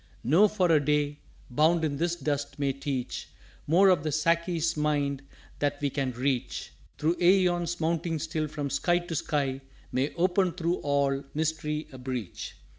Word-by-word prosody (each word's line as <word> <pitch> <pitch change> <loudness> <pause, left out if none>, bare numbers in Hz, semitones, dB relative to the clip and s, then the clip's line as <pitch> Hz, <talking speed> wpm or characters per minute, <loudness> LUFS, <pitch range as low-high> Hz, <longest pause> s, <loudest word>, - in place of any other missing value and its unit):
_" - - -32 0.2
"No, 170 - +5
for 185 -4 +1
a 150 -3 +4
day 145 0 +1 0.3
bound 160 +5 +3
in 145 -2 -2
this 170 +2 0
Dust 145 -2 -3
may 140 -2 0
teach 135 -2 -4 0.4
More 185 +6 +6
of 180 -5 +4
the 155 - -2
Sáki's 165 +2 +1
Mind 145 -2 0 0.4
than 145 -1 +1
we 145 -1 -1
can 135 -2 -1
reach 130 +1 -2 0.2
Through 165 +3 +1
æons 175 -2 +3
mounting 165 0 0
still 155 0 -2
from 145 -2 -4
Sky 175 +5 +2
to 175 -1 -5
Sky 140 -3 -1 0.3
May 135 +3 0
open 180 0 +2
through 170 0 -1
all 140 -1 0
Mystery 155 0 -1
a 130 - -10
breach." 125 -7 -5
150 Hz, 165 wpm, -28 LUFS, 140-170 Hz, 0.4 s, More